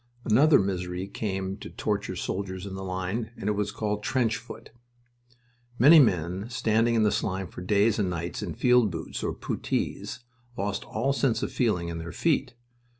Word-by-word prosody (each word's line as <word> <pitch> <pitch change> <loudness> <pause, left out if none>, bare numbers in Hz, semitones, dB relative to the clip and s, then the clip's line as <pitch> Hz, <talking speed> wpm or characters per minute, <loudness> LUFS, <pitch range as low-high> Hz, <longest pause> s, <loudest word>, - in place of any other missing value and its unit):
Another 140 +8 +6
misery 90 -1 -2
came 95 -2 -3
to - - -9
torture 100 -3 -2
soldiers 95 +1 -4
in 100 - -6
the 95 0 -5
line, 95 +4 -3
and 100 - -5
it - - +3
was 105 0 -1
called 105 0 -2
"trench 115 -1 +1
foot." 115 +2 -11 1.1
Many 150 +8 +8
men 95 - +1
standing 115 -1 +2
in 110 -2 +3
slime 95 -1 -1
for 90 - -9
days 105 +4 +2
and 100 -3 +1
nights 85 0 -4
in - - -4
field 125 -3 +4
boots 80 -2 -5
or - - -1
puttees 120 - -3 0.4
lost 100 0 -2
all 130 +5 0
sense 135 -4 +1
of - - -2
feeling 95 -9 0
in 85 -1 -4
their 80 0 -6
feet. 140 - 0
105 Hz, 170 wpm, -27 LUFS, 95-115 Hz, 1.1 s, Many